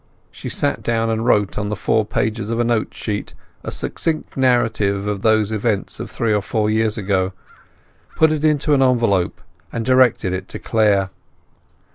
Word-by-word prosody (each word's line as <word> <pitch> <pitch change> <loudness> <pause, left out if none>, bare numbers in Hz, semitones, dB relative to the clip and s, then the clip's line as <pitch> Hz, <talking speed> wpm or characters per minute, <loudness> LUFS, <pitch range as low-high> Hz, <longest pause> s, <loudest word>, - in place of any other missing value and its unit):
She - - -7
sat - - 0
down 115 -1 0
and 110 0 -1
wrote 105 -5 +2
on 105 0 -2
the 105 - -2
four 105 +3 0
pages 110 -1 -2
of 115 0 -1
a - - +3
note 115 -2 0
sheet 105 -2 -5 0.3
a - - -4
succinct 160 -2 -3
narrative 110 -6 +1
of 105 -2 -2
those 110 -1 +2
events 110 -2 -1
of - - -6
three 115 -2 -1
or 105 - +1
four 105 +1 -1
years 110 0 +1
ago, 95 -2 0 0.8
put 160 -1 +4
it 155 -1 -2
into 150 -1 +2
an 135 - +3
envelope, 115 -8 +2 0.3
and 115 -1 -3
directed 130 -7 +3
it 95 - -4
to - - -7
Clare. 100 -4 +1
110 Hz, 175 wpm, -20 LUFS, 105-120 Hz, 0.8 s, put